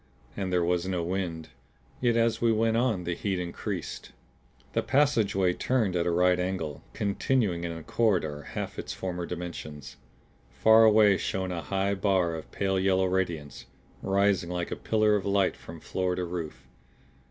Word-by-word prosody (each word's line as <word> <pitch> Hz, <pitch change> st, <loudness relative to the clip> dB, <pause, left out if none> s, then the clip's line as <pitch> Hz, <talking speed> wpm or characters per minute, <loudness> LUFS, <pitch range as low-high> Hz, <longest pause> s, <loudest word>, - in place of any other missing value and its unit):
And 95 Hz, -2 st, -3 dB
there 90 Hz, -1 st, +2 dB
was 90 Hz, +1 st, 0 dB
no 90 Hz, -2 st, -1 dB
wind. 85 Hz, -3 st, -3 dB, 0.5 s
Yet 120 Hz, -2 st, +2 dB
as 115 Hz, 0 st, +1 dB
we 115 Hz, -1 st, +4 dB
went 110 Hz, +1 st, +2 dB
on 115 Hz, -6 st, +1 dB
the 90 Hz, -, -2 dB
heat 95 Hz, +2 st, -2 dB
increased. 90 Hz, -2 st, -5 dB, 0.6 s
The -, -, +2 dB
passageway 110 Hz, -10 st, +2 dB
turned 110 Hz, -4 st, 0 dB
at 85 Hz, -1 st, +1 dB
a -, -, +3 dB
right 90 Hz, +1 st, +3 dB
angle, 90 Hz, -5 st, -3 dB
continuing 100 Hz, -3 st, 0 dB
in 85 Hz, -, -3 dB
a 80 Hz, -1 st, -7 dB
corridor 95 Hz, -10 st, 0 dB
half -, -, -4 dB
its -, -, -5 dB
former 90 Hz, -2 st, -4 dB
dimensions. 85 Hz, -4 st, -7 dB, 0.5 s
Far 110 Hz, -, +5 dB
away 105 Hz, -2 st, +6 dB
shone 95 Hz, -1 st, -2 dB
a 85 Hz, -1 st, -3 dB
high 100 Hz, +2 st, -1 dB
bar 95 Hz, -4 st, +1 dB
of 80 Hz, -1 st, -7 dB
pale 95 Hz, -1 st, 0 dB
yellow 95 Hz, 0 st, +2 dB
radiance, 85 Hz, -7 st, -2 dB, 0.3 s
rising 100 Hz, -2 st, +1 dB
like 90 Hz, -1 st, -3 dB
a -, -, -1 dB
pillar 110 Hz, -1 st, +2 dB
of 100 Hz, -, -1 dB
light 100 Hz, -1 st, +1 dB
from 85 Hz, 0 st, -11 dB
floor 90 Hz, +1 st, -2 dB
to 90 Hz, 0 st, -2 dB
roof. 80 Hz, -7 st, -6 dB
95 Hz, 165 wpm, -28 LUFS, 85-100 Hz, 0.6 s, away